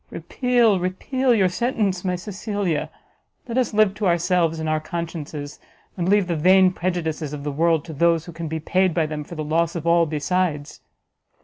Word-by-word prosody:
Repeal, 240 -6 +1
repeal 250 +9 -1
your 195 -4 +3
sentence, 195 -2 -1
my 180 -1 0
Cecilia! 195 -2 -3 0.6
let 235 - -4
us 255 -2 +1
live 215 -2 +3
to 205 -1 -2
ourselves 170 -1 +1
and 160 - -3
our 155 0 +1
consciences, 155 -3 -6 0.4
and 180 -1 -1
leave 205 -1 +4
the 175 -1 -2
vain 185 +4 +5
prejudices 165 -5 -3
of 145 -1 -6
the 145 - -2
world 160 +1 +1
to 160 - -8
those 165 +1 +2
who 170 - -9
can 165 0 -6
be 160 +1 -3
paid 185 +2 +1
by 165 -2 +2
them 150 -1 -5
for 170 - -10
the 155 - -4
loss 165 +2 0
of 165 -1 -4
all 170 0 +4
besides!" 155 -1 -2
170 Hz, 190 wpm, -22 LUFS, 160-190 Hz, 0.6 s, vain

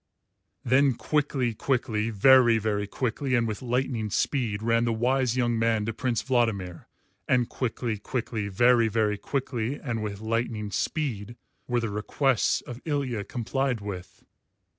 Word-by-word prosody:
Then 130 +1 +4
quickly, 135 -4 0
quickly, 115 -2 -1
very 120 +2 +6
very 105 -2 -1
quickly, 130 +4 -1
and 120 -1 +2
with 105 -1 -4
lightning 125 -3 -1
speed, 110 -2 -1
ran 115 0 +2
the 120 - +1
wise 125 +2 +1
young 120 -2 +1
man 115 -2 +1
to 115 - -2
Prince 120 0 -1
Vladimir, 110 -9 -1 0.4
and 125 -2 +3
quickly, 115 -3 -3
quickly, 115 -2 -3
very 115 +3 +4
very 105 -1 0
quickly, 130 -1 -2
and 115 -5 -3
with 100 -2 -4
lightning 110 -1 -2
speed, 120 -2 -2 0.3
were 120 -1 +1
the 115 -2 -2
"requests" 120 +4 +1
of 120 +1 -9
Ilya 135 -9 -2
complied 125 +1 -1
with. 95 -3 -8
115 Hz, 140 wpm, -27 LUFS, 110-130 Hz, 0.4 s, very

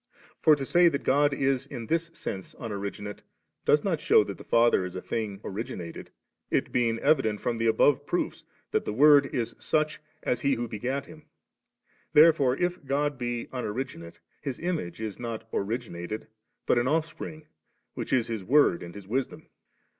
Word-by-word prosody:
For 155 - +6
to 140 -2 -4
say 175 +4 +5
that 140 - -3
God 145 +2 +3
is 135 -1 0
in 125 -5 -6
thb 165 0 -1
sense 95 -1 -6
Unoriginate, 105 -1 -5 0.5
does - - +4
not - - 0
shew - - +5
that - - -7
the - - -9
Son 120 0 +4
is 90 0 -6
a - - -3
thing 105 -4 -3
originated, 95 -5 -6 0.4
it - - 0
being 115 -2 +1
evident 135 -7 +2
from 120 -2 -2
the 115 - +1
above 145 +5 +3
proofs 175 - -2 0.3
that - - +1
the - - -3
Word 145 +3 +7
is 120 -5 -3
such 155 0 0 0.2
as 125 - 0
He 140 0 +2
is - - -1
who 120 +1 -2
begat 125 +6 -3
Him. 155 +1 -14 0.9
Therefore 150 -4 +6
if 175 -2 -1
God 140 0 -1
be 120 -1 -2
unoriginate. 120 -8 -5 0.2
His 135 -4 -4
Image 165 - -3
is 110 -3 -5
not 115 -2 -5
origin 110 0 -2
ated, 90 +6 -5 0.4
but 120 - +3
an 120 - 0
Ofifspring7, 155 0 -2 0.5
which - - -5
is 125 -3 +3
His 110 -4 -4
Word 130 -5 +4
and 85 +1 -9
His 100 -2 -10
Wisdom. 130 +4 -3
125 Hz, 175 wpm, -28 LUFS, 110-145 Hz, 0.9 s, Word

